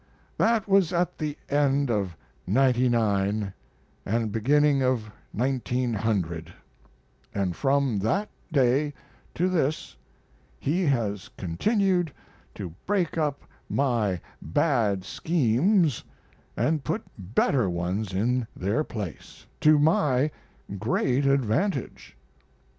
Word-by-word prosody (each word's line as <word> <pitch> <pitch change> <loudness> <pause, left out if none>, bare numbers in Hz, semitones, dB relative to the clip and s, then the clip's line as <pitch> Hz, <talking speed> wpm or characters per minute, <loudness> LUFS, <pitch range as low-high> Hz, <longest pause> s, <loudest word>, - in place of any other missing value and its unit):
That 225 -2 +2
was 195 -3 +4
at 175 0 0
the 150 -1 -3
end 140 -2 +2
of 95 -7 -1 0.3
'99 110 -6 +2 0.5
and 110 +1 -1
beginning 140 +5 +3
of 125 -5 0 0.2
1900; 110 -9 -1 0.8
and 95 -4 -1
from 135 -5 +1
that 125 - 0 0.2
day 140 +1 +2 0.4
to 180 - +1
this 155 - -1 0.6
he 170 +4 0
has 110 -8 -1
continued 180 - +1 0.4
to 90 -5 -6
break 190 -4 +1
up 150 -2 -1 0.3
my 115 -9 +1 0.2
bad 110 - +1
schemes 160 - +2 0.5
and 155 -2 +1
put 215 - -2 0.2
better 105 +3 +1
ones 90 +4 -2
in 115 +5 0
their 100 +11 0
place, 105 - -7
to 155 0 +6
my 145 -2 +3 0.5
great 130 +5 +1
advantage. 135 - 0
130 Hz, 95 wpm, -26 LUFS, 105-150 Hz, 0.8 s, to